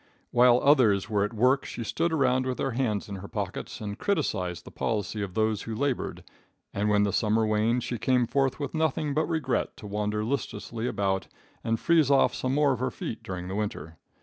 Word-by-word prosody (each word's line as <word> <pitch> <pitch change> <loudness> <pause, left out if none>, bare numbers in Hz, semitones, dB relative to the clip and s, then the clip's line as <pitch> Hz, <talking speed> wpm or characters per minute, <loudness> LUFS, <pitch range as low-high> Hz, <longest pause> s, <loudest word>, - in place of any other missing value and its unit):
While 120 0 +6
others 115 -8 +4
were 100 -1 +2
at 105 - -1
work 130 +5 +3
she 115 - -6
stood 165 +9 -1
around 130 -4 +2
with 130 - -2
her 135 - -1
hands 115 -4 -1
in 100 -1 -6
her 100 +2 -8
pockets - - -5
and 105 0 -5
criticised 90 - -1
the - - -10
policy 110 -1 -2
of 95 -3 -5
those 110 -1 +1
who 115 - -5
labored, 135 +2 -2 0.5
and 105 +1 0
when 105 -1 +4
the 100 - 0
summer 110 0 +2
waned 110 +3 +1
she 120 - -3
came 125 +1 +2
forth 135 +3 0
with 145 - -4
nothing 155 -2 0
but 155 +3 0
regret 155 -6 -1
to 115 - -11
wander 105 +1 -2
listlessly 120 -2 -3
about 95 -4 -1 0.4
and 115 -1 0
freeze 165 -5 +3
off 140 -1 +4
some 130 +1 -1
more 145 -2 +4
of 125 - -4
her 130 +1 0
feet - - -6
during 90 -1 -6
the 95 - -5
winter. 90 -7 -4
115 Hz, 205 wpm, -27 LUFS, 105-135 Hz, 0.5 s, While